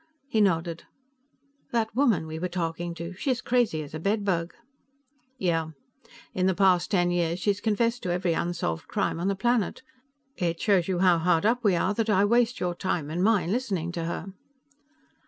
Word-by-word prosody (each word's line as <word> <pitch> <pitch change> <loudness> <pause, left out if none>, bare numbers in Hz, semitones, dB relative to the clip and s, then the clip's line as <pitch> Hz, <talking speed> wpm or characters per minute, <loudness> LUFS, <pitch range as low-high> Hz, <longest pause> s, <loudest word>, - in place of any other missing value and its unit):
He 220 -5 +1
nodded. 170 -4 0 0.8
"That 225 -2 -1
woman 235 - +2
we 160 0 -6
were 180 - -1
talking 170 -1 -3
to. 170 +2 -6
She's 250 +6 -1
crazy 240 -11 +1
as 145 - -12
a 155 - -4
bedbug." 195 -3 -1 0.8
"Yeah. 165 -5 -1 0.6
In 185 0 +1
the 190 - +2
past 185 -2 +3
ten 175 -3 +2
years 170 -1 0
she's 200 +2 0
confessed 230 +2 0
to 180 - -3
every 175 -1 0
unsolved 165 - -2
crime - - -1
on 175 - -1
the 200 - +1
planet. 240 +2 0 0.5
It 170 -2 -1
shows 195 -5 +2
you 185 -2 0
how 180 -2 +4
hard 165 +1 +2
up 240 +2 +2
we 200 -4 +4
are 175 - +1
that 225 +1 -1
I 200 -1 +4
waste 240 +2 +2
your 180 -1 -1
time 175 -4 -2
and 175 +3 -1
mine 195 -5 +2
listening 195 -8 -1
to 170 -2 -4
her." 170 +3 -5
180 Hz, 180 wpm, -27 LUFS, 170-210 Hz, 0.8 s, how